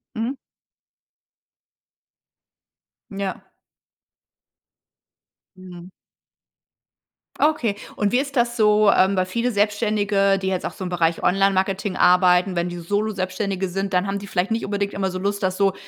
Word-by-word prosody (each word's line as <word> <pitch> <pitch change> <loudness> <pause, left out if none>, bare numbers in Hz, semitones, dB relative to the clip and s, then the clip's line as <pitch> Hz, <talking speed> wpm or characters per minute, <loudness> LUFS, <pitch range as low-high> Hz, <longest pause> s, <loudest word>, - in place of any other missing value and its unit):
Mhm. 230 +5 -2 2.8
Ja. 195 -1 -5 2.1
Mhm. 180 -1 -12 1.5
Okay 250 -9 +1 0.2
und 205 -1 +1
wie 250 - +4
ist 275 0 -4
das 240 0 +1
so, 210 -2 +4
ähm, 190 +1 +3
weil 185 - +2
viele 235 +6 -1
Selbstständige, 205 -2 +1
die 190 - -4
jetzt 185 -1 -2
auch - - -3
so - - -8
im - - -4
Bereich 170 -2 0
Online-Marketing 195 0 +1
arbeiten, 180 +1 +4
wenn 170 +1 -1
die 175 - -7
Solo-Selbstständige 195 0 -2
sind, 195 +2 -4
dann 180 +2 +1
haben 200 0 -2
die 200 - -9
vielleicht 190 +2 -1
nicht 225 +1 -1
unbedingt 200 0 -2
immer 190 -1 -2
so 185 - -5
Lust, 200 +1 -2
das 185 0 0
so 195 -1 +2
195 Hz, 135 wpm, -22 LUFS, 185-210 Hz, 2.8 s, wie